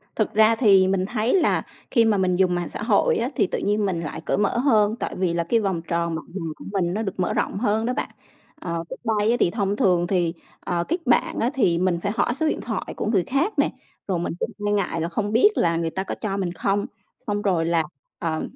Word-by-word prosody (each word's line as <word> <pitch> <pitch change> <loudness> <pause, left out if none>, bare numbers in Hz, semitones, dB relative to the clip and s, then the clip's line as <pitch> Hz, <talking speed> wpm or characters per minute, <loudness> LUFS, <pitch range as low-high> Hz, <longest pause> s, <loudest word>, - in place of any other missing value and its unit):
Thực 215 - 0
ra 220 +1 +5
thì 195 -5 +5
mình 190 -1 +1
thấy 225 +1 +1
là 370 - +2 0.3
khi 230 -3 +4
mà 215 -2 +3
mình 185 -1 +2
dùng 180 -1 +2
mạng 175 -1 -2
xã - - -5
hội 210 -2 +3
á, 235 +3 -1
thì - - +2
tự - - -3
nhiên 205 +1 +1
mình 180 -4 -1
lại 155 - -5
cởi - - 0
mở 205 +3 +1
hơn, 220 -5 +3
tại - - -4
vì 180 -2 0
là 170 0 0
cái 225 +8 +2
vòng 190 -5 -1
tròn 170 0 -1
bạn 155 -3 -6
bè 195 - -3 0.2
của - - -11
mình 175 -3 0
nó 215 - -1
được 195 -3 -4
mở 180 - 0
rộng - - -1
hơn 220 0 +1
đó 250 - 0
bạn. 280 - -3 0.5
Ờ, 170 -1 -3
trước - - -5 0.2
đây 210 +3 +2
á 240 - +2
thì - - +4
thông 200 -1 -1
thường 180 -4 +2
thì, 175 -3 +1 0.3
ờ, 170 -1 -2
kết 340 - 0
bạn 240 - +2
á 235 - +2
thì 180 -11 +2
mình 180 -1 +1
phải 200 +4 -2
hỏi 240 - +1
số 315 +5 0
điện - - -1
thoại - - -4
của - - -2
người 205 -4 +2
khác 315 - -1
nè, - - +3 0.4
rồi 185 -3 0
mình 170 - -2
cũng - - -2 0.2
e - - +1
ngại 195 -5 0
là 165 - -1
không 205 +4 -2
biết 235 - +6
là 170 -1 +2
người 165 -1 -1
ta 190 +4 -3
có - - -4
cho 200 -3 -3
mình 185 -3 -1
không, 200 +2 0 0.4
xong 205 -1 -1
rồi 180 -5 +1
là, 165 -1 +2 0.4
ờ, 160 -1 -2
195 Hz, 260 wpm, -23 LUFS, 175-220 Hz, 0.5 s, biết